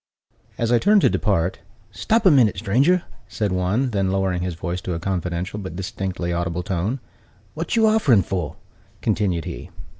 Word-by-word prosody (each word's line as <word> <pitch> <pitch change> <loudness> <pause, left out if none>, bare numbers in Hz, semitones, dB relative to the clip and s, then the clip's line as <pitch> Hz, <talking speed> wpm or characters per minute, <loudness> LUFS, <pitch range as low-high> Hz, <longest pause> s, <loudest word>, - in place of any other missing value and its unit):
As 115 0 0
I 120 - +5
turned 205 - +4
to - - +4
depart, 95 -4 0 0.3
"Stop 225 - 0
a 185 - +8
minute, 120 -9 +4
stranger!" 135 - +2 0.2
said 105 -3 -2
one: 95 +8 0
then 100 -3 0
lowering 95 -2 0
his 90 -1 -3
voice 90 +2 -4
to 90 - -3
a - - -3
confidential 90 +1 -3
but 95 -4 -7
distinctly 95 -1 -3
audible 85 0 -2
tone, 100 +7 -2 0.5
"What 165 +7 -3
you 225 -1 +4
offering 160 - +4
for?" 90 -7 -3 0.5
continued 90 -6 0
he. - - -7
95 Hz, 170 wpm, -22 LUFS, 90-120 Hz, 0.5 s, a